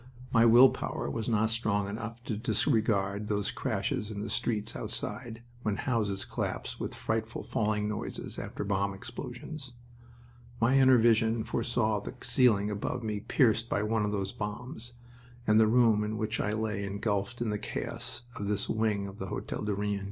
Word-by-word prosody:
My 115 0 +6
will 120 +3 +8
power 70 - -3
was 110 - -2
not 110 0 +2
strong 105 -3 +1
enough 115 +3 -6
to 115 - -2
disregard 105 -4 +1
those 105 -1 0
crashes 105 - -2
in 105 -1 -4
the - - -4
streets 105 -3 -1
outside, 115 -2 -5 0.2
when 105 -4 0
houses 105 -4 0
collapsed - - -3
with - - -4
frightful 110 +1 -2
falling 105 -1 0
noises 105 0 -4
after - - -4
bomb 100 0 0
explosions. 135 +6 -7 0.9
My 120 +4 +4
inner 130 -1 +7
vision 115 -1 +3
foresaw 115 -2 0
the 105 - -7
ceiling 105 -6 +3
above 110 +4 -3
me 105 -2 -2
pierced 115 0 +2
by 100 - +1
one 110 0 +1
of 105 - 0
those 100 -1 -2
bombs, 120 +3 -5 0.5
and 105 0 +5
the 110 - +6
room 115 -2 +4
in 105 +1 -2
which 110 +1 -1
I 105 - 0
lay 105 -2 -1
engulfed 100 +2 -2
in 120 -3 0
the 105 - -2
chaos 120 +2 -4
of 100 -3 -4
this 105 -1 0
wing 110 -2 0
of 100 +1 -8
the 95 - -4
Hotel - - -4
du 105 -1 -1
Rhin. 100 0 -1
110 Hz, 175 wpm, -30 LUFS, 105-115 Hz, 0.9 s, will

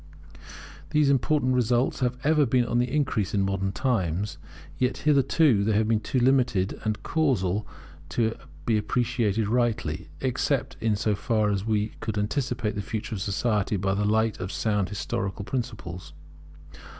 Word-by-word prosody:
These 150 -2 +3
important 135 -1 +2
results 125 +1 +1
have 125 -1 -1
been 150 - +3
ever 155 -2 +4 0.2
on 120 - +1
the 125 0 0
increase 135 -9 0
in 100 - +2
modern 95 0 -1
times; 100 - -1 0.4
yet 125 0 +1
hitherto 140 -5 +4
they 110 +1 +1
have 110 +1 +2
been 110 -1 +2
too 120 - -3
limited 120 -7 +2
and 110 -1 -2
casual 110 - 0 0.4
to 110 +7 +1 0.3
be 110 -2 +2
appreciated 115 -2 0
rightly, 120 0 0
except 130 +1 -1 0.2
so 105 +1 0
far 105 +1 +1
as 100 0 -1
we 105 -1 +1
could 110 -2 -3
anticipate 120 0 -1
the 100 - -3
future 110 +2 -4
of 100 - -4
society 105 +1 0
by 95 +1 0
the 100 +1 0
light 110 +1 +1
of 90 +1 -4
sound 105 -4 0
historical 100 -1 -3
principles. 95 - -5
110 Hz, 150 wpm, -26 LUFS, 100-125 Hz, 0.4 s, ever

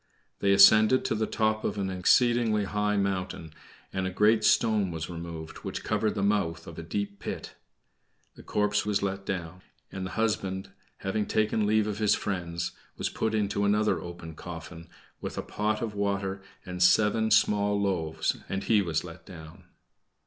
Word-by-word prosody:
They 100 - +2
ascended 110 +5 +7
to - - +1
the 110 0 -1
top 110 0 0
of - - -2
an 95 -1 -1
exceedingly 110 +3 +3
high 105 +1 0
mountain, 95 -5 -2 0.4
and 95 -1 -1
a - - -1
great 105 +4 +3
stone 110 -3 +3
was 80 0 -5
removed, 85 -2 -7
which - - -6
covered 110 -1 0
the 100 - -1
mouth 85 -5 0
of 85 - -9
a - - -4
deep 100 +4 -4
pit. - - -6 0.8
The - - -14
corpse 105 0 0
was 105 -1 0
let 95 0 -3
down, 90 -1 -4 0.3
and 95 - -5
the 95 - -4
husband, 95 -4 -1 0.3
having 100 +2 -2
taken 110 0 +1
leave 110 0 +3
of 105 -1 -3
his 105 -2 +3
friends, 85 -3 -3 0.3
was - - -1
put 110 0 -1
into 100 -1 0
another 105 +1 +2
open 85 -2 -8
coffin, 85 0 -9 0.3
with - - -6
a - - -2
pot 105 +1 -1
of 110 -2 -3
water 100 -1 -2 0.2
and 90 -1 -6
seven 110 +4 +4
small 105 -2 +3
loaves, 85 -6 0
and 95 - -2
he 110 -2 +3
was 85 -4 -1
let 85 -1 -10
down. 80 -3 -12
100 Hz, 170 wpm, -28 LUFS, 90-105 Hz, 0.8 s, ascended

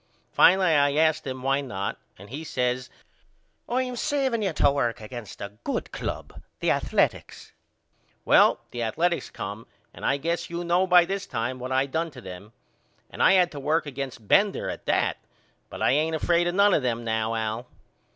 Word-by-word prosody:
Finally 185 -1 +5
I 145 -1 +3
asked 155 -1 +2
him 130 -1 -5
why 135 +1 +1
not 100 -8 -4 0.2
and 100 +4 -13
he 150 +4 -5
says 125 -3 -2 0.8
I 255 +2 +1
am 250 -1 -5
saving 265 -3 0
you 195 -3 0
to 145 - +3
work 120 -5 -1
against 110 0 -9
a 100 +1 -8
good - - -3
club, - - -6 0.2
the - - +1
Athaletics. - - -1 0.7
Well - - +5
the 120 - -5
Athaletics 170 +10 0
come 100 +3 -7 0.3
and - - -12
I 140 - +2
guess 170 +4 -2
you 170 +1 -4
know 175 +2 +2
by 180 -1 +6
this 195 +2 -4
time 125 +3 -3
what 130 +1 -6
I 130 +1 +2
done 160 +4 -2
to 135 -5 -12
them. 95 +1 -10 0.6
And - - -6
I - - +6
had 180 -2 +4
to 145 - -7
work 155 +4 0
against 135 -6 -6
Bender 200 - +3
at - - -10
that - - +1 0.5
but - - -6
I - - +4
ain't 155 +4 +1
afraid 170 +2 +2
of 175 - -1
none 200 0 +5
of - - +3
them 120 -2 -1
now 110 0 -1
Al. 110 +2 -3
140 Hz, 190 wpm, -26 LUFS, 120-175 Hz, 0.8 s, by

